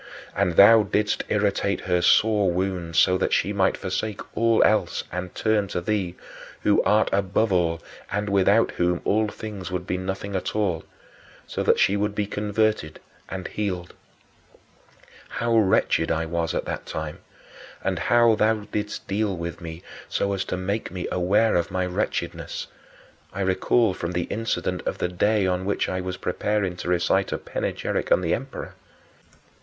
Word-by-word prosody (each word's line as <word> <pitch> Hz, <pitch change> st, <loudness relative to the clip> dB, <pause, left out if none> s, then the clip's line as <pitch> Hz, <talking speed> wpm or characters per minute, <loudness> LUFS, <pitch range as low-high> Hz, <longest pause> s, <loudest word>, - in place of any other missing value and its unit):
And 95 Hz, -3 st, +1 dB
thou 110 Hz, +4 st, +8 dB
didst 105 Hz, +1 st, 0 dB
irritate 100 Hz, -1 st, +1 dB
her 90 Hz, 0 st, +1 dB
sore 105 Hz, +2 st, +4 dB
wound 90 Hz, -2 st, -2 dB
so 90 Hz, +4 st, +4 dB
that -, -, 0 dB
she 105 Hz, -, +1 dB
might 95 Hz, -2 st, +2 dB
forsake 105 Hz, +2 st, -3 dB
all 115 Hz, -1 st, +4 dB
else 110 Hz, 0 st, +2 dB
and 90 Hz, +1 st, -5 dB
turn 110 Hz, -2 st, +1 dB
to 90 Hz, -, -2 dB
thee 90 Hz, -1 st, -2 dB, 0.5 s
who 105 Hz, -, +4 dB
art 105 Hz, +1 st, +3 dB
above 100 Hz, +2 st, +1 dB
all 85 Hz, -2 st, +1 dB, 0.3 s
and 105 Hz, +2 st, -1 dB
without 100 Hz, +3 st, +3 dB
whom 90 Hz, 0 st, 0 dB
all 110 Hz, +1 st, +2 dB
things 105 Hz, -3 st, -7 dB
would 90 Hz, -1 st, -3 dB
be 90 Hz, -1 st, -2 dB
nothing 95 Hz, +1 st, -4 dB
at 95 Hz, -, -3 dB
all 90 Hz, -7 st, 0 dB, 0.6 s
so -, -, -4 dB
that -, -, +3 dB
she 95 Hz, -, +3 dB
should 100 Hz, 0 st, -1 dB
be 105 Hz, -, 0 dB
converted 105 Hz, -5 st, -1 dB, 0.3 s
and 95 Hz, -1 st, -5 dB
healed. 90 Hz, -4 st, -3 dB, 1.4 s
How 115 Hz, 0 st, 0 dB
wretched 95 Hz, -6 st, +3 dB
I 80 Hz, 0 st, 0 dB
was 85 Hz, 0 st, -2 dB
at -, -, -1 dB
that -, -, -5 dB
time, 80 Hz, -1 st, -5 dB, 0.6 s
and -, -, -1 dB
how 120 Hz, -1 st, +4 dB
thou 110 Hz, 0 st, +2 dB
didst 105 Hz, 0 st, -4 dB
deal 100 Hz, -1 st, -1 dB
with 85 Hz, +1 st, -5 dB
me 80 Hz, 0 st, -8 dB, 0.3 s
so 100 Hz, 0 st, 0 dB
as 95 Hz, -1 st, -1 dB
to 90 Hz, -, -3 dB
make 100 Hz, +4 st, -2 dB
me 90 Hz, 0 st, -5 dB
aware 100 Hz, +5 st, +2 dB
of 85 Hz, -1 st, +1 dB
my 95 Hz, 0 st, -1 dB
wretchedness, 85 Hz, -3 st, -3 dB, 0.7 s
I 100 Hz, -, -4 dB
recall 95 Hz, +3 st, +2 dB
from 90 Hz, 0 st, -4 dB
the 90 Hz, 0 st, 0 dB
incident 100 Hz, -4 st, -2 dB
of -, -, -1 dB
the 90 Hz, -, -1 dB
day 105 Hz, +3 st, +2 dB
on 90 Hz, 0 st, 0 dB
which 100 Hz, +2 st, 0 dB
I 95 Hz, 0 st, -2 dB
was 90 Hz, 0 st, -4 dB
preparing 95 Hz, 0 st, -1 dB
to 90 Hz, -, -5 dB
recite 90 Hz, +2 st, +1 dB
a -, -, -1 dB
panegyric -, -, -3 dB
on -, -, +5 dB
the -, -, 0 dB
emperor. -, -, -5 dB
95 Hz, 170 wpm, -24 LUFS, 90-105 Hz, 1.4 s, thou